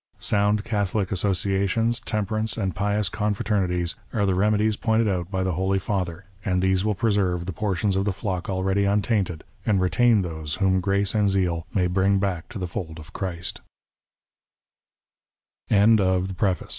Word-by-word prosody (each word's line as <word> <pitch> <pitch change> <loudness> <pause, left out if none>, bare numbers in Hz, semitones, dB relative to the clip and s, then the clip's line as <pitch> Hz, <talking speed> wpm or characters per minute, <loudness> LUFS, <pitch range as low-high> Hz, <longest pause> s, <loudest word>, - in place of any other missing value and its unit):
Sound 105 +1 +1
Catholic 105 -3 -1
asso 100 +1 +1
ciations, 100 +5 0
temperance, 110 +1 -1
and 95 -5 -1
pious 105 +1 0
confraternities, 100 -4 0 0.2
are 105 -4 +1
the 95 - +2
remedies 105 +3 +2
pointed 110 +1 +1
out 90 -3 -1
by 95 -1 -1
the 95 - 0
Holy 95 +3 0
Father, 90 -1 -3 0.2
and 90 -2 +1
these 95 0 +2
will 105 -1 0
preserve 95 -5 +1
the 95 - -4
portions 100 0 0
of 95 - +1
the 105 - +1
flock 95 -2 -4
already 95 +1 +1
untainted, 100 -4 0 0.2
and 100 -3 +2
retain 110 +3 +3
those 80 -3 -4
whom 95 -1 +2
grace 100 +1 0
and 105 -2 +2
zeal 90 -4 0
may 90 -3 +1
bring 95 +2 +2
back 95 -4 -2
to 120 - -7
the 90 - -3
Eold 85 +2 -5
95 Hz, 145 wpm, -24 LUFS, 90-105 Hz, 0.2 s, retain